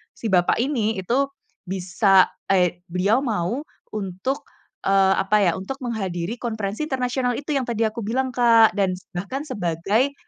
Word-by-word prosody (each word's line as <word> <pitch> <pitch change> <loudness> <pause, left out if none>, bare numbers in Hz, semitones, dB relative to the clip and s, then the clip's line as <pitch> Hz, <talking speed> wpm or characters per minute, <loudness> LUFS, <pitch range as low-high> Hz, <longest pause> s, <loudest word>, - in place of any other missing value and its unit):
si 225 - -4
bapak 175 -1 +3
ini 225 -7 0
itu 270 +8 +1 0.4
bisa, 190 +1 +3 0.2
eee, 180 -2 +2
beliau 200 +8 +2
mau 220 +4 -1 0.3
untuk, 195 +7 -3 0.4
eee, 195 0 +4
apa 210 +2 +2
ya, 175 - +4
untuk 230 +9 -5
menghadiri 195 -3 -3
konferensi 220 +3 -3
internasional 250 -1 0
itu 290 +1 -3
yang 260 - -1
tadi 230 -1 0
aku 230 +2 -7
bilang, 260 +4 0
Kak. 230 -2 +5
Dan 190 -2 +2 0.2
bahkan 260 +11 -3
sebagai 205 - 0
215 Hz, 145 wpm, -23 LUFS, 190-250 Hz, 0.4 s, Kak